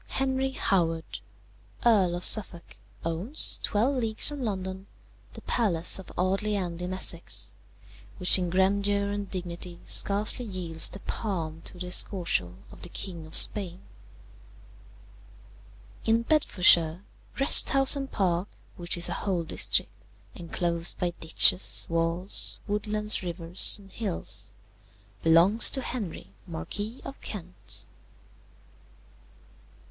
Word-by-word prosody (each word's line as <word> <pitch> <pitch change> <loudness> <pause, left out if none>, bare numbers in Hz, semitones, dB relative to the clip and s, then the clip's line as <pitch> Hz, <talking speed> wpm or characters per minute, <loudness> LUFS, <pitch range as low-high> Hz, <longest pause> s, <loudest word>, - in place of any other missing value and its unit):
"Henry 265 0 -2
Howard, 165 -8 -2 0.7
Earl 195 -7 +3
of 175 - -2
Suffolk, 180 -5 +2 0.3
owns, 175 - +2
twelve 245 +7 0
leagues 225 -3 +4
from 290 -2 -2
London, 190 -3 -5 0.5
the - - -12
palace 185 -7 0
of 190 - -12
Audley 195 +3 -1
End 175 -3 -4
in 180 +1 -5
Essex, 185 0 -2 0.6
which 180 0 +5
in 180 -1 -2
grandeur 200 +2 0
and 205 -1 -5
dignity 175 -1 -5
scarcely 205 +4 +2
yields 175 -6 -1
the 195 - -6
palm 165 -7 -5
to - - -4
the 180 - -6
Escorial 175 - +1 0.2
of - - -15
the 175 - -6
King 170 -3 -7
of 155 - -5
Spain. 190 -3 +2 2.2
"In 230 +1 +1
Bedfordshire, 180 - +3 0.4
Wrest 275 - +6
House 270 0 +4
and 275 -1 -6
Park, 180 -1 -1 0.3
which 175 0 0
is 175 - +4
a - - -3
whole 185 -4 -2
district, 155 - -1 0.3
enclosed 170 +1 -1
by 175 -1 -2
ditches, 165 +3 +4
walls, 165 +3 +1
woodlands, 210 +1 -1
rivers, 170 -1 +2
and 195 -2 -18
hills, 205 -7 -5 0.7
belongs 170 +7 +5
to 265 - -3
Henry, 200 - -7
Marquis 205 - -6
of 275 - -10
Kent. 175 - -6
185 Hz, 120 wpm, -26 LUFS, 170-210 Hz, 2.2 s, Wrest